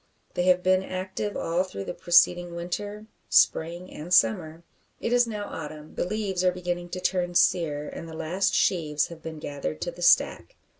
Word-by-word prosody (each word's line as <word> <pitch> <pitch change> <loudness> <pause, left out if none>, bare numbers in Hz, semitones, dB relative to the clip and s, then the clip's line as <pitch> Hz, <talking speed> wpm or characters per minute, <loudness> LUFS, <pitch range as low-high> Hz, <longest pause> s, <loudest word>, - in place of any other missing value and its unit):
They 180 - 0
have 180 0 +4
been 185 0 +4
active 190 +2 -4
all 170 +2 0
through 100 - -7
the - - -4
preceding 175 0 +3
winter, 205 +5 -5 0.2
spring, 170 +3 +2
and 160 +4 -8
summer. 155 +4 +3 0.4
It 230 - -1
is 245 -1 +4
now 210 -2 -4
autumn; 155 -3 -8
the - - -2
leaves 195 -2 -2
are 180 - +4
beginning 175 -1 -4
to 185 - -5
turn 180 -1 -1
sere, 150 -5 +2
and 165 - -8
the 160 - -8
last 170 +5 0
sheaves 150 -5 +1
have 170 -1 -11
been 160 -1 -7
gathered 140 - -5
to - - -2
the - - -12
stack. - - +3
175 Hz, 185 wpm, -26 LUFS, 160-185 Hz, 0.4 s, have